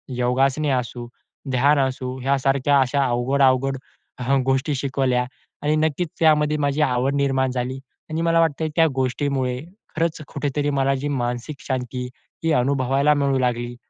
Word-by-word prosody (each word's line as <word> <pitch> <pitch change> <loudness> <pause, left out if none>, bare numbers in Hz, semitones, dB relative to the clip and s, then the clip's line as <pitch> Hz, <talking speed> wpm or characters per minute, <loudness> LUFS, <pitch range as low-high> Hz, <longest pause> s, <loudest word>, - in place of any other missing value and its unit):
योगासने 130 +4 +1
असू, 125 -2 -2 0.4
ध्यान 140 +3 +3
असू 130 -1 -1
ह्यासारख्या 135 +1 +2
अशा 135 +2 +1
अवघड-अवघड 135 +2 +2 0.4
हं, 135 +2 +2
गोष्टी 135 +3 +1
शिकवल्या 130 -2 0 0.4
आणि 150 +1 +1
नक्कीच 155 +2 0
त्यामध्ये 150 -2 +3
माझी 145 0 0
आवड 130 0 +1
निर्माण 135 -2 +1
झाली. 130 +1 -3 0.3
आणि 160 +1 -1
मला 165 0 +3
वाटतंय 160 -1 +1
त्या 165 -1 +5
गोष्टीमुळे 130 -1 -1 0.4
खरंच 165 0 -1
कुठेतरी 145 0 -1
मला 135 -1 +1
जी 135 +2 -3
मानसिक 125 +1 -3
शांती 125 -1 -3 0.4
ही 165 - +1
अनुभवायला 135 +2 +2
मिळू 140 -2 +1
लागली. 120 -1 -1
135 Hz, 140 wpm, -22 LUFS, 130-145 Hz, 0.4 s, त्या